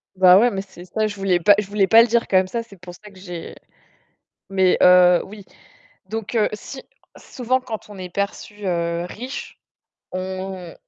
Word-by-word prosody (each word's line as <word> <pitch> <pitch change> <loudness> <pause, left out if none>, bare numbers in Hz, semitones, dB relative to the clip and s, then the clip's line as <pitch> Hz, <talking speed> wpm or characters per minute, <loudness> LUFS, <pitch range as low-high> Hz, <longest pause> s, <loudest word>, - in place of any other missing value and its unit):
Bah, 185 0 +7
ouais, 240 +3 +4
mais 195 -4 -4
c'est 190 -2 -14
ça, 215 +3 -1
je 210 - -6
voulais 190 -3 0
pas 205 +4 +6
je 210 - -3
voulais 200 -1 +1
pas 225 +2 +7
le 230 - +3
dire 235 0 +1
quand 190 - +4
même 185 0 +2
ça, 230 +4 -4
c'est 200 -5 -17
pour 175 0 -11
ça 210 +4 -14
que 190 - -17
j'ai 175 -3 -8 1.0
mais 190 -1 +2
heu, 180 -1 +6
oui. 200 -1 -12 0.6
Donc, 225 +1 -5
heu, 215 -2 +2
si, 260 +5 -8 0.4
souvent 255 +1 -2
quand 225 -4 -8
on 205 - -11
est 180 -1 -7
perçu, 200 +2 -5
heu, 170 -1 -1
riche, 250 +9 -8 0.5
on 185 -1 -6
195 Hz, 195 wpm, -21 LUFS, 180-215 Hz, 1.0 s, Bah